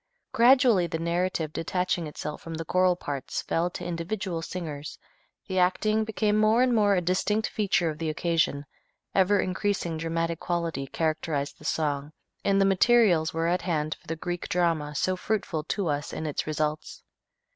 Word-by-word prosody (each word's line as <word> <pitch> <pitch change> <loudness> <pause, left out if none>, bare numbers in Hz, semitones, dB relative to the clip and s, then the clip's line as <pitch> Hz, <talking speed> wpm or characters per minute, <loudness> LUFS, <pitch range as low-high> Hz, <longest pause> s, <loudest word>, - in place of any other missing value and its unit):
Gradually 240 -6 +5
the 165 - -3
narrative 170 -1 -1
detaching 180 0 -1
itself 150 0 -6
from 165 -1 -6
the 165 +1 -5
choral 185 +1 +3
parts 140 -6 -4
fell 170 +2 0
to - - -7
individual 175 0 -3
singers, 155 -4 -6 0.5
the 190 -1 0
acting 215 +4 +2
became 215 -1 +1
more 220 +3 +4
and 255 -1 +2
more 205 -3 +4
a 180 - +2
distinct 195 +5 +1
feature 195 -5 +1
of 155 - -10
the 160 -1 -1
occasion, 160 -3 0 0.5
ever 195 +1 +4
increasing 185 -3 -1
dramatic 165 +1 -2
quality 170 -6 -2
characterized 155 -2 -2
the - - -13
song, 145 -1 -1 0.3
and 195 0 +3
the 195 - +4
materials 195 -4 +4
were 165 0 -1
at 175 +2 +1
hand 155 -4 -1
for - - -24
the 165 - -2
Greek 175 +2 -4
drama 165 -4 0
so 185 +6 +1
fruitful 185 -5 -2
to 200 +2 -2
us 145 -2 -2
in 160 - -4
its 150 0 -2
results. 155 0 -3
170 Hz, 170 wpm, -27 LUFS, 155-195 Hz, 0.5 s, Gradually